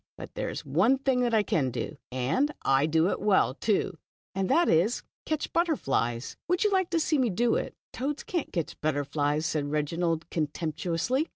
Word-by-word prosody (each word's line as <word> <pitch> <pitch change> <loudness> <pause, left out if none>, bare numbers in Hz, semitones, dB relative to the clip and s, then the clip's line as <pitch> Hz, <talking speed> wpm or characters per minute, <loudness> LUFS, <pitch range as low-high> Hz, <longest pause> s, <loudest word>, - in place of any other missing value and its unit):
But - - -9
there - - -3
is - - -6
one 180 - +3
thing 250 -3 +1
I 220 -2 +3
can 140 -8 +1
do, 125 - -4 0.2
and 130 - +1
I 135 +2 +3
do 160 +3 +3
it - - -2
well, 195 -10 +3
too, 185 0 0 0.3
and 190 0 -1
that 345 0 +4
is 180 +9 +3
to - - -39 0.2
catch 310 -1 -2
butterflies. 135 - 0
Would 360 +4 +2
you 420 - +3
like 375 -2 +2
to 335 -1 +1
see 305 -2 +1
me 250 -3 +3
do 230 +5 +2
it? - - -2
" - - -67
"Toads 280 +4 -3
can't 365 -9 -3
catch 170 -4 -4
butterflies," 145 0 0
said 150 -3 -1
Reginald, 165 +2 -1
contemptuously. 165 - -1
175 Hz, 190 wpm, -28 LUFS, -, 0.3 s, that